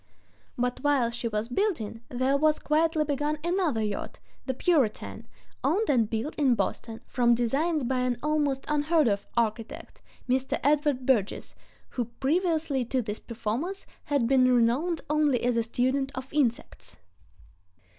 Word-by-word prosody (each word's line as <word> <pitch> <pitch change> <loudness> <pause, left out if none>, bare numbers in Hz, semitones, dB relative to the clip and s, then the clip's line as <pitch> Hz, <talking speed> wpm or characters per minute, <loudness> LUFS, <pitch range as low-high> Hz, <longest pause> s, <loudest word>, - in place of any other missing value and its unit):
But 245 0 -1
while 280 -5 +2
she 235 0 -3
was 215 0 -2
building 245 - -1
there 260 +2 +1
was 305 +1 +3
quietly 315 +1 +1
begun 295 +1 -1
another 345 - 0
yacht, 210 -1 -4 0.3
the 260 - -1
Puritan, 275 -7 0 0.4
owned 410 +1 +2
and 230 -6 +2
built 230 +7 -2
in 270 -5 +3
Boston 225 0 -3
from 240 -1 +2
designs 280 +7 0
by 255 +1 0
an 250 -1 0
almost 295 -3 0
unheard 300 0 +2
of 200 -1 -1
architect, 225 -1 -2 0.3
Mr. 260 +1 0
Edward 290 -3 +2
Burgess, 225 -7 0 0.4
who 245 - -2
previously 305 - 0
to 255 +1 -1
this 210 0 -4
performance 245 - -4 0.2
had 285 -5 +1
been 255 0 +4
renowned 250 +8 +2
only 300 -4 +2
as 245 0 +2
a 230 - +2
student 260 +4 0
of 260 +1 -7
insects! 240 - -1
265 Hz, 145 wpm, -27 LUFS, 235-300 Hz, 0.4 s, been